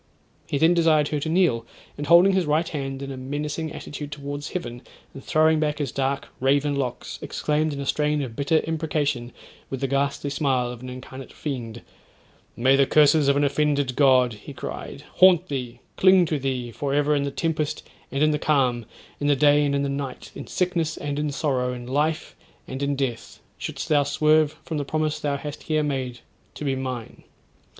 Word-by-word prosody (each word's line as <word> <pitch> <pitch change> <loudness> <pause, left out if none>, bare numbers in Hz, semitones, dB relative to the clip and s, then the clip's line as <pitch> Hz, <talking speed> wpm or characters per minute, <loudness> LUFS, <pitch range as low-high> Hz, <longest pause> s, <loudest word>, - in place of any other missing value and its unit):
He 145 - -1
then 160 +4 +5
desired 160 -3 +3
her 150 - -1
to 160 - -3
kneel, 160 -9 +2 0.3
and 145 0 -5
holding 175 +4 +7
his 185 -4 +1
right 155 +3 +2
hand 135 -3 -4
in 140 - -5
a 135 - -6
menacing 150 +4 -4
attitude 145 0 -7
towards 145 0 -5
heaven, 125 -9 -5 0.3
and 135 - -10
throwing 155 0 +3
back 150 -1 0
his 145 -5 -2
dark 135 0 -2
raven 140 +2 +2
locks, 130 -3 -4
exclaimed 155 +1 -1
in 140 - -5
a 140 - -4
strain 150 +2 +1
of 120 -4 -7
bitter 155 +4 +2
imprecation 150 -6 -1 0.4
with 135 - -4
the 135 - -1
ghastly 140 +1 -1
smile 130 -4 0
of 125 -1 -9
an 130 - -7
incarnate 130 +1 -9
fiend, 120 -6 -5 0.7
'May 130 +3 +4
the 135 -1 +4
curses 150 -1 +5
of 140 0 +4
an 145 - +2
offended 145 -2 +1
God,' 130 -4 +4
he 105 - -10
cried, - - -7
'haunt 185 -1 +6
thee, 125 -4 -5 0.2
cling 185 -1 +6
to 155 -2 -1
thee 130 -3 -3
for 140 +4 -2
ever 145 +1 +2
in 145 - +2
the 140 - -1
tempest 155 +1 -2 0.2
and 135 +2 +1
in 155 - +4
the 150 - 0
calm, 130 -7 +1 0.3
in 145 - -1
the 145 - +4
day 145 +1 +4
and 140 -1 +1
in 140 - +1
the - - 0
night, 140 -1 -5
in - - -8
sickness 170 -3 -1
and 145 0 -3
in 150 -1 -1
sorrow, 130 -4 -1
in 120 -1 -7
life 150 +5 -1 0.3
and 130 +1 -6
in 140 0 0
death, 125 -4 -4 0.2
shouldst - - -5
thou 150 -3 +4
swerve 155 +2 +2
from 155 -1 -3
the - - -1
promise 155 +1 -1
thou 140 -1 -1
hast 145 +1 -7
here 155 -1 0
made 130 -4 -3 0.3
to 150 - -6
be 135 -1 +1
mine. 130 -3 -6
145 Hz, 200 wpm, -24 LUFS, 135-155 Hz, 0.7 s, holding